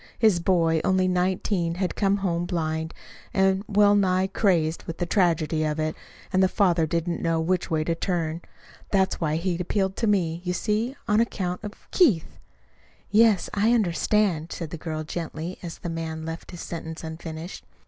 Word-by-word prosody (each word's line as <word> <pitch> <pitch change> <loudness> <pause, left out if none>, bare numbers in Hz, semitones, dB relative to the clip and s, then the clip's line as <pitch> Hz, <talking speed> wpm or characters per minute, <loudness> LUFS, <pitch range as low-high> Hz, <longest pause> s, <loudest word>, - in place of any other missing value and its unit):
His 215 -6 +4
boy 165 -3 +2
only 185 0 +2
nineteen 180 -1 0
had 185 0 -2
come 200 -1 +2
home 175 -3 -1
blind, 160 -2 -2 0.4
and 190 0 +3
well 205 0 +5
nigh 190 -2 +3
crazed 175 -5 +1
with 165 - -6
the 175 - -1
tragedy 165 -4 +1
of 155 0 -1
it. 155 0 -1 0.4
And 185 - +4
the 190 - +5
father 175 -4 +2
didn't 170 +2 -1
know 165 -1 +1
which 175 +2 0
way 155 -1 +1
to 165 - 0
turn. 165 -1 -2 0.5
That's 190 -2 +1
why 155 -2 +1
he 175 +3 0
had 175 +1 -2
appealed 190 +1 0
to 230 - 0
me. 175 -5 +1
You 180 -1 -1
see, 215 +7 -1
on 210 -1 +3
account 185 -6 -1
of 210 0 -9
Keith 240 - +2 0.4
" - - -33 0.3
"Yes, 215 -3 +4
I 215 +3 +3
understand," 185 -4 +1
said 165 -3 -5
the - - -4
girl 155 -1 -4
gently, 165 +2 -5
as 170 -2 -7
the - - -7
man 160 -1 -4
left 165 +1 -6
his 175 - -8
sentence 160 -1 -6
unfinished. 160 +1 -7
175 Hz, 180 wpm, -25 LUFS, 165-195 Hz, 0.5 s, well